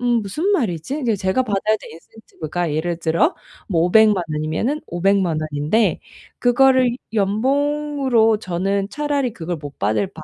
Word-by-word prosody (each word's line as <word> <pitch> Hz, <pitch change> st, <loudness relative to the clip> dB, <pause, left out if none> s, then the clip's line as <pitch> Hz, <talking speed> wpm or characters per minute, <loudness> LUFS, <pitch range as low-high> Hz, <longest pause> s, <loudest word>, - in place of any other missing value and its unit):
'음. 240 Hz, -2 st, +1 dB
무슨 250 Hz, -, -3 dB
말이지?' 235 Hz, -, -1 dB
이제 230 Hz, -4 st, +1 dB
제가 190 Hz, +7 st, 0 dB
받아야 215 Hz, 0 st, 0 dB
될 -, -, -11 dB
인센티브가 170 Hz, -2 st, -6 dB
예를 170 Hz, +2 st, -2 dB
들어 170 Hz, -, +1 dB, 0.3 s
뭐 170 Hz, -4 st, +1 dB
5,000,000 205 Hz, +1 st, +4 dB
원이면은 155 Hz, -, -1 dB
5,000,000 180 Hz, -2 st, +1 dB
원인데 155 Hz, +8 st, 0 dB, 0.4 s
그거를 255 Hz, 0 st, +4 dB, 0.2 s
연봉으로 265 Hz, +2 st, +1 dB
저는 195 Hz, +1 st, -2 dB
"차라리 290 Hz, -4 st, -1 dB
그걸 170 Hz, -2 st, -5 dB
못 145 Hz, -2 st, -10 dB
받을 110 Hz, -, 0 dB
200 Hz, 280 characters per minute, -20 LUFS, 170-255 Hz, 0.4 s, 5,000,000